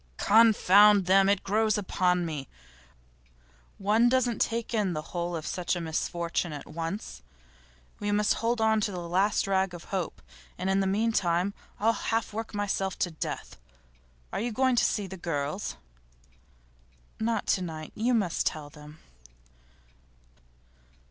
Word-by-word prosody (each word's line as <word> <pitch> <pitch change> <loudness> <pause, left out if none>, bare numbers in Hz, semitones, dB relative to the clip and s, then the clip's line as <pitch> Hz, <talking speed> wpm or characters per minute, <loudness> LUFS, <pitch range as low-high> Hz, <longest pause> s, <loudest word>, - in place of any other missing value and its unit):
'Confound 210 -2 +6
them! 195 +1 +5
It 200 -1 +1
grows 215 +1 +1
upon 180 -3 +1
one. 150 -5 -5 1.3
One 215 +4 +3
doesn't 250 -2 +1
take 230 0 -1
in 205 -5 +1
the 155 -1 -4
whole 175 0 -2
of 160 - -5
such 180 0 -1
a - - -3
misfortune 170 +1 -2
at 145 - -7
once. 165 - -5 0.8
We 205 0 -2
must 210 0 +3
hold 230 +1 0
on 220 -1 +3
to 205 - -1
the 180 - -5
last 190 +4 +1
rag 190 -2 0
of 170 - -10
hope, 185 -4 -2 0.4
and 185 +2 -1
in 195 - +2
the 195 - +1
meantime 195 -3 +1 0.3
I'll 225 +2 +3
half 225 -2 -2
work 225 0 -5
myself 195 -2 -1
to 175 - -1
death. 155 - -6 0.8
Are - - -1
you 240 +1 -2
going 260 +3 +2
to - - +4
see 205 - 0
the 190 0 -8
girls?' 165 +2 -3 1.4
'Not 225 -1 -1
to 185 - +2
night. 160 -3 -6
You 240 +3 +1
must 195 -7 0
tell 150 -2 -4
them. 150 0 -13
195 Hz, 150 wpm, -28 LUFS, 175-215 Hz, 1.4 s, Confound